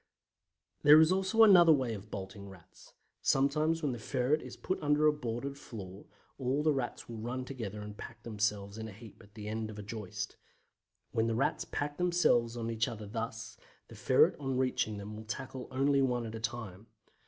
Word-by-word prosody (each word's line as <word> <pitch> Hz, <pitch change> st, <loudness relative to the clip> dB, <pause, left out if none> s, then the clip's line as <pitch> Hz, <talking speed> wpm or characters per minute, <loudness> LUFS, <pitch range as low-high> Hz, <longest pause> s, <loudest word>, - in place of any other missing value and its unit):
There 150 Hz, +1 st, +9 dB
is 160 Hz, +2 st, +6 dB
also 190 Hz, +4 st, +4 dB
another 180 Hz, -6 st, +8 dB
way 130 Hz, -6 st, +2 dB
of 105 Hz, 0 st, -8 dB
bolting 100 Hz, 0 st, -7 dB
Rats. 90 Hz, -3 st, -16 dB, 0.3 s
Sometimes 155 Hz, +4 st, +2 dB
when 145 Hz, -, +1 dB
the 120 Hz, -, -5 dB
ferret 130 Hz, +6 st, 0 dB
is -, -, -9 dB
put 185 Hz, -, -3 dB
under 150 Hz, 0 st, +3 dB
a 150 Hz, -, +6 dB
boarded 135 Hz, +1 st, -4 dB
floor, 95 Hz, -6 st, -9 dB, 0.3 s
all 135 Hz, +3 st, 0 dB
the 155 Hz, -1 st, +4 dB
Rats 130 Hz, -3 st, -3 dB
will 115 Hz, -2 st, -7 dB
run 125 Hz, +3 st, -4 dB
together 110 Hz, -6 st, -6 dB
and 105 Hz, 0 st, -8 dB
pack 110 Hz, +1 st, -10 dB
themselves 105 Hz, -2 st, -2 dB
in 110 Hz, -, -5 dB
a -, -, -8 dB
heap 110 Hz, 0 st, -13 dB
at 105 Hz, -1 st, -19 dB
the 105 Hz, -2 st, -7 dB
end 110 Hz, 0 st, -3 dB
of 105 Hz, -, -8 dB
a 105 Hz, -, -6 dB
joist. 105 Hz, -2 st, -6 dB, 0.7 s
When 115 Hz, 0 st, +1 dB
the 115 Hz, -, 0 dB
Rats 130 Hz, -, 0 dB
pack 145 Hz, 0 st, -3 dB
themselves 145 Hz, -10 st, +2 dB
on 115 Hz, 0 st, -2 dB
each 115 Hz, +2 st, 0 dB
other 110 Hz, -4 st, -6 dB
thus, 115 Hz, +1 st, -5 dB, 0.3 s
the -, -, -11 dB
ferret -, -, +4 dB
on 135 Hz, -2 st, -2 dB
reaching 125 Hz, -5 st, 0 dB
them 100 Hz, +1 st, -7 dB
will 110 Hz, -, -8 dB
tackle 130 Hz, +2 st, -6 dB
only 140 Hz, +1 st, +2 dB
one 125 Hz, -3 st, +1 dB
at 110 Hz, -, -6 dB
a 115 Hz, -, -5 dB
time. 115 Hz, -3 st, -5 dB
120 Hz, 200 wpm, -32 LUFS, 110-140 Hz, 0.7 s, There